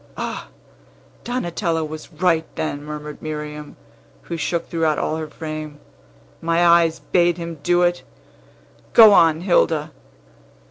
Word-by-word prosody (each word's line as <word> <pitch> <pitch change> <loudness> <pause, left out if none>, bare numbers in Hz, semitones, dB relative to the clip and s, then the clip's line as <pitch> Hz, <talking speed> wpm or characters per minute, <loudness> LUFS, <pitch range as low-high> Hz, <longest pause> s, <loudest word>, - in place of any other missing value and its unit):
"Ah! - - -5 0.8
Donatello 175 -8 -2
was 155 +2 -9
right, 165 0 +1
then," 145 -2 -3
murmured 150 0 -8
Miriam, 150 -1 -6 0.5
who 170 - -5
shook 165 +2 -2
throughout 160 -2 0
all 155 - -1
her 160 -1 -5
frame. 155 -1 -7 0.6
"My 165 +1 +2
eyes 170 -1 +4
bade 175 -1 +3
him 170 -2 -6
do 175 +3 +2
it! 175 0 +1 0.9
Go 220 -3 +9
on, 165 -3 +4
Hilda." 160 -4 +1
165 Hz, 125 wpm, -21 LUFS, 155-175 Hz, 0.9 s, Go